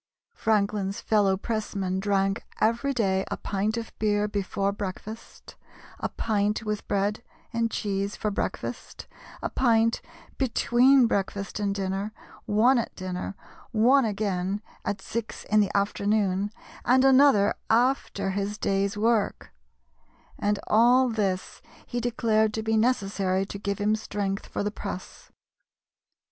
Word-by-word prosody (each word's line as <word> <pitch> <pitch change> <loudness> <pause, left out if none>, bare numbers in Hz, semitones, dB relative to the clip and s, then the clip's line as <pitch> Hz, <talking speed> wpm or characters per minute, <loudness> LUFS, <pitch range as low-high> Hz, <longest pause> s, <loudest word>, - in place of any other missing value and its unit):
Franklin's 205 -2 0
fellow 200 -3 +2
pressman 195 -3 -2
drank 195 0 0 0.2
every 235 +5 +2
day 195 -7 +1
a - - -3
pint 210 +3 -1
of 230 -1 -5
beer 210 -1 +2
before 200 -1 -1
breakfast, 205 +2 -8 0.4
a - - -2
pint 210 -1 0
with 210 -1 -3
bread 205 +2 0 0.3
and 230 0 +1
cheese 200 -1 -2
for 210 - -2
breakfast, 200 - -4 0.4
a - - -1
pint 230 -2 +2 0.4
between 260 +1 +4
breakfast 200 -2 -2
and 200 -1 0
dinner, 195 +2 -2 0.3
one 235 +5 +4
at 230 - -4
dinner, 185 +1 -5 0.4
one 250 +5 +5
again 200 -2 -1 0.2
at 195 -1 -3
six 230 -1 -5
in 215 - +2
the 205 -1 +2
afternoon, 200 -1 +1 0.3
and 260 +2 +4
another 265 -6 +6 0.2
after 230 -5 +1
his 200 +2 -2
day's 195 0 0
work; 225 -1 0 0.9
and 205 0 +1
all 245 +4 +5
this 195 -5 -2 0.2
he 240 - -3
declared 220 -2 +1
to 220 - -2
be 220 0 +1
necessary 195 -5 +1
to 200 - -7
give 200 -1 -2
him 210 +1 +2
strength 205 -2 -3
for - - -3
the 205 - -1
press. 200 -3 -8
210 Hz, 130 wpm, -26 LUFS, 195-225 Hz, 0.9 s, another